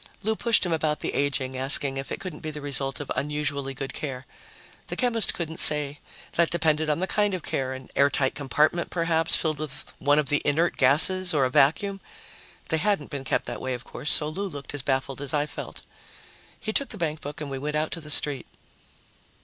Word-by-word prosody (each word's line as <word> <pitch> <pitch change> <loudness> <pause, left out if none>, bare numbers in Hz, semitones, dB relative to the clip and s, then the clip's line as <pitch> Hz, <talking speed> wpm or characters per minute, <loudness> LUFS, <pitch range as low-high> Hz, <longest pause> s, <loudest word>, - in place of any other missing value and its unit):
Lou 220 +2 +1
pushed 230 -3 +2
him 175 - 0
about 155 -1 0
the - - -3
aging, 135 -2 -1
asking 135 +1 +3
if 135 0 -6
it - - -3
couldn't 180 -5 -6
be 155 - -5
the 150 -1 -7
result 140 -2 -1
of 145 - -6
unusually 140 -2 -2
good 135 +1 -5
care. 135 -3 -5 0.6
The - - -4
chemist 235 -3 +1
couldn't 160 -1 -3
say 150 -1 +5 0.3
that 170 -1 +2
depended 155 -2 +1
on 150 - +1
the - - +2
kind 205 0 +1
of 180 - -6
care; 130 -1 -2
an 130 -1 -9
airtight 140 -1 +2
compartment, 150 +5 +1
perhaps, 165 -1 +2
filled 155 -3 -1
with 140 -3 -5
one 145 +2 +3
of 150 -2 +1
the 145 - +2
inert 160 +4 +1
gases, 175 +7 +4
or 135 -3 +3
a 130 - -1
vacuum. 195 +9 +2 0.7
They 160 - +2
hadn't 200 -5 0
been 140 -2 -5
kept - - -1
that - - -6
way, 130 -1 -2
of 125 - -8
course, 150 - -1
so 150 - +5
Lou 195 +6 -3
looked 145 -6 -8
as 145 - -3
baffled 135 0 -2
as 145 +1 -3
I 145 0 +1
felt. 150 - -8 0.8
He 215 - -4
took 280 - 0
the 215 - -7
bankbook 155 -4 -4
and 150 -2 -6
we 135 - -4
went 150 +2 -3
out 155 +1 -1
to 170 - -4
the 150 - -11
street. 145 -3 +2
150 Hz, 215 wpm, -25 LUFS, 140-165 Hz, 0.8 s, say